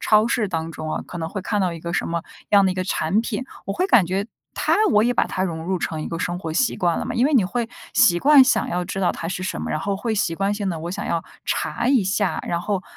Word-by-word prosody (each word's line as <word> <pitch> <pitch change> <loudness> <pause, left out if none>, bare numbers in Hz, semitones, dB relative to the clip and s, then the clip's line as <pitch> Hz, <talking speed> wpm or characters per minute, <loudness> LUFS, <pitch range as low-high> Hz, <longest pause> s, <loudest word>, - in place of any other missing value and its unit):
超 215 0 +4
市 230 -3 0
当 165 -2 -3
中 155 0 -5
啊， - - -3
可 175 - -7
能 160 0 -3
会 200 - -5
看 210 0 -1
到 180 -2 +1
一 165 - -7
个 170 0 -5
什 - - 0
么 170 0 -2 0.3
样 200 -1 +6
的 185 - +2
一 - - -8
个 185 - -1
产 185 +3 +1
品， 255 +2 -3 0.2
我 195 - -1
会 370 - 0
感 220 - +5
觉 195 +3 -1 0.3
它 - - +1 0.2
我 210 -1 +5
也 245 - +2
把 - - +2
它 185 - -2
融 165 -3 -3
入 185 0 -1
成 160 -1 -3
一 - - -5
个 165 - -4
生 175 0 -2
活 165 -3 -5
习 235 +8 +1
惯 175 -2 +1
了 - - -3
嘛， - - -4
因 245 - +3
为 300 - +1
你 215 -7 +5
会 230 +4 -2 0.2
习 175 0 +5
惯 285 +2 +7
想 260 - +2
要 180 0 -1
知 195 +1 -4
道 180 - +2
它 165 - -5
是 185 0 -4
什 190 - -3
么， - - -4
然 155 - 0
后 195 +4 -2
会 220 +2 -2
习 165 -5 0
惯 195 +3 0
性 205 -2 -2
地 165 - -4
“我 170 +2 -4
想 - - -4
要 165 - -1 0.2
查 235 - -1
一 260 -6 +4
下”， 190 +1 0
然 170 - 0
后 195 -1 -2
190 Hz, 320 characters per minute, -22 LUFS, 170-215 Hz, 0.3 s, 惯